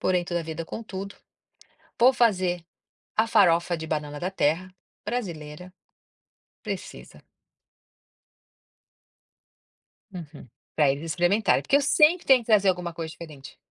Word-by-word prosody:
porém, 180 -1 +1
toda 175 -1 -2
vida, 160 +1 -6
contudo, 200 -1 -7 0.9
vou 245 +3 +7
fazer 185 -8 +1 0.5
a 220 +1 +3
farofa 175 -6 +3
de 160 - -7
banana 150 -2 -4
da 180 - -2
terra 185 +1 0 0.3
brasileira. 180 -6 -6 0.9
Precisa. - - -8 2.9
Uhum, 160 -7 -10 0.3
pra 150 -3 +3
eles 140 +2 -3
experimentarem, 175 +6 +1
porque 280 - +2
eu 285 - +2
sempre 305 +5 +4
tenho 265 -2 +6
que 230 - -14
trazer 205 -3 +4
alguma 180 -2 -1
coisa 165 -1 -5
diferente. 155 -5 -11
175 Hz, 120 wpm, -25 LUFS, 160-210 Hz, 2.9 s, vou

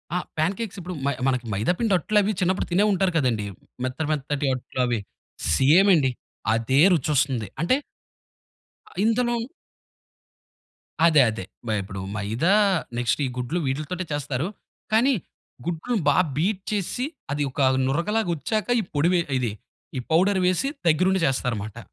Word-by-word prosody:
ఆ! - - +3 0.2
ప్యాన్‌కేక్స్ 195 +6 -1
ఇప్పుడు 180 0 -6
మ 140 - +3 0.2
మనకి 125 -2 0
మైదాపిండి 180 - +1
అట్లవి 210 +4 +2
చిన్నప్పుడు 185 +1 0
తినే 190 +4 +3
ఉంటారు 190 -1 +2
కదండీ. 120 -7 +1 0.4
మెత్త 130 +5 -2
మెత్తటి 145 -1 -1
అట్లవి. 125 -2 -1 0.6
సేమ్ 165 +9 +5
అండి. 135 -5 +2 0.4
అదే 115 +4 +1
రుచొస్తుంది. 135 - +1
అంటే 175 +10 +3 1.1
ఆహ్, - - -14
ఇందులో 235 +1 +1 1.6
అదే 155 -5 +6
అదే. 110 -4 -6 0.2
బై 110 - +1
అప్పుడు 95 0 -7 0.2
మైదా 115 - +1 0.4
నెక్స్టు 120 +4 0
ఈ - - -2
గుడ్లు 130 +8 -2
వీట్లీతోటే 155 +7 -2
చేస్తారు. 145 +1 -2 0.5
కానీ 260 +5 +4 0.5
గుడ్లు 175 +8 -2
బా 145 - +4 0.2
బీట్ 185 +4 0
చేసిసి 210 +6 -1 0.3
అది 145 0 -1
ఒక 140 - -5 0.3
నురగలాగా 175 +8 0
వచ్చాక 215 - -2
ఈ - - -1
పొడి 145 +3 +3 0.3
ఇది 120 -4 -1 0.5
ఈ - - -1
పౌడర్ 190 +4 +3
వేసి 185 +9 +1 0.2
దగ్గరుండి 185 +4 +3
జేస్తారన్నమాట. 120 -6 -1
155 Hz, 130 wpm, -24 LUFS, 130-190 Hz, 1.6 s, అదే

